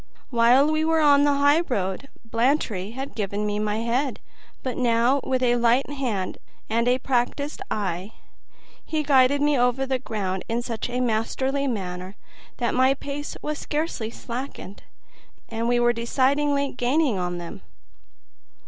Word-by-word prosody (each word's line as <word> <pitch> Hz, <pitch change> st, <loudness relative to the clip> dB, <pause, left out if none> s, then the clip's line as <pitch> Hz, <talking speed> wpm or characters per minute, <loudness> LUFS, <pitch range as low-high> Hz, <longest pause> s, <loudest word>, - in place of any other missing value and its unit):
While 250 Hz, +5 st, +5 dB
we 310 Hz, 0 st, +1 dB
were 320 Hz, 0 st, +2 dB
on 285 Hz, -1 st, +5 dB
the 290 Hz, -, +4 dB
highroad, 275 Hz, -, +1 dB, 0.2 s
Blantyre 230 Hz, -4 st, 0 dB
had 270 Hz, +2 st, -6 dB
given 205 Hz, -1 st, -2 dB
me 210 Hz, 0 st, -1 dB
my 210 Hz, +1 st, -1 dB
head; 250 Hz, +4 st, -1 dB, 0.4 s
but 255 Hz, -2 st, -2 dB
now, 245 Hz, +2 st, +2 dB
with 255 Hz, -1 st, 0 dB
a 245 Hz, -1 st, +3 dB
light 240 Hz, +3 st, +3 dB
hand 235 Hz, -10 st, -3 dB, 0.3 s
and 230 Hz, +2 st, +1 dB
a 250 Hz, +1 st, +4 dB
practiced 270 Hz, +5 st, -1 dB
eye, 195 Hz, -1 st, -3 dB, 0.7 s
he 310 Hz, -1 st, -2 dB
guided 280 Hz, 0 st, +4 dB
me 295 Hz, 0 st, +3 dB
over 250 Hz, +2 st, +2 dB
the 260 Hz, -1 st, -1 dB
ground 190 Hz, -5 st, -3 dB
in 235 Hz, +1 st, -1 dB
such 235 Hz, 0 st, -4 dB
a 250 Hz, +1 st, -1 dB
masterly 260 Hz, +4 st, 0 dB
manner 185 Hz, -4 st, -4 dB, 0.4 s
that 240 Hz, -2 st, 0 dB
my 260 Hz, +2 st, +4 dB
pace 285 Hz, +1 st, -6 dB
was 300 Hz, -1 st, -3 dB
scarcely 295 Hz, -7 st, -2 dB
slackened, 235 Hz, -4 st, -7 dB, 0.7 s
and 230 Hz, 0 st, -2 dB
we 240 Hz, 0 st, +3 dB
were 240 Hz, 0 st, +4 dB
decidedly 280 Hz, +4 st, +1 dB
gaining 250 Hz, -3 st, +1 dB
on 180 Hz, 0 st, -2 dB
them. 170 Hz, -, -8 dB
245 Hz, 150 wpm, -24 LUFS, 225-280 Hz, 0.7 s, While